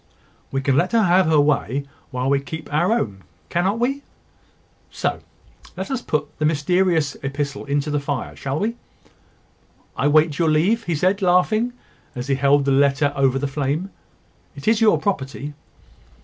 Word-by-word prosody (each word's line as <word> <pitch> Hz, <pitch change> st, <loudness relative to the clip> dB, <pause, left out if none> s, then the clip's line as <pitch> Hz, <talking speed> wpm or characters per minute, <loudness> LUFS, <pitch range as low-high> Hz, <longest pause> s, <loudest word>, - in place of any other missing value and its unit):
"We 135 Hz, -, -1 dB
can 135 Hz, -1 st, +1 dB
let 180 Hz, +9 st, +1 dB
her 230 Hz, -1 st, +4 dB
have 185 Hz, -1 st, +4 dB
her 155 Hz, -2 st, +4 dB
way 140 Hz, -2 st, +1 dB, 0.2 s
while 125 Hz, 0 st, -2 dB
we 140 Hz, 0 st, +3 dB
keep 155 Hz, +2 st, -8 dB
our 170 Hz, +7 st, +2 dB
own, 100 Hz, -, -1 dB, 0.3 s
cannot 190 Hz, +5 st, 0 dB
we? 270 Hz, +4 st, -1 dB, 0.9 s
So, -, -, -2 dB, 0.6 s
let -, -, -4 dB
us 260 Hz, -2 st, -1 dB
put 150 Hz, -1 st, -3 dB
the 155 Hz, -, +1 dB
mysterious 160 Hz, 0 st, +1 dB
epistle 140 Hz, 0 st, -3 dB
into 145 Hz, +1 st, -1 dB
the 145 Hz, -, +1 dB
fire 140 Hz, -1 st, -4 dB
shall 135 Hz, +1 st, -3 dB
we? 225 Hz, +7 st, -2 dB, 1.2 s
I -, -, +1 dB
wait 155 Hz, +1 st, +3 dB
your 165 Hz, -2 st, +3 dB
leave," 185 Hz, +10 st, +2 dB
said 185 Hz, +5 st, +2 dB
he, 195 Hz, -, -1 dB
laughing, 215 Hz, +7 st, +2 dB, 0.4 s
as 125 Hz, +2 st, -5 dB
he -, -, +3 dB
held 140 Hz, +1 st, +3 dB
the 140 Hz, -, +2 dB
letter 140 Hz, +1 st, +3 dB
over 135 Hz, -1 st, +2 dB
the 145 Hz, +1 st, -1 dB
flame. 145 Hz, +7 st, -2 dB, 0.6 s
"It 140 Hz, -, -10 dB
is 220 Hz, 0 st, +3 dB
your 220 Hz, -1 st, +5 dB
property." 145 Hz, -6 st, -3 dB
150 Hz, 165 wpm, -21 LUFS, 140-185 Hz, 1.2 s, your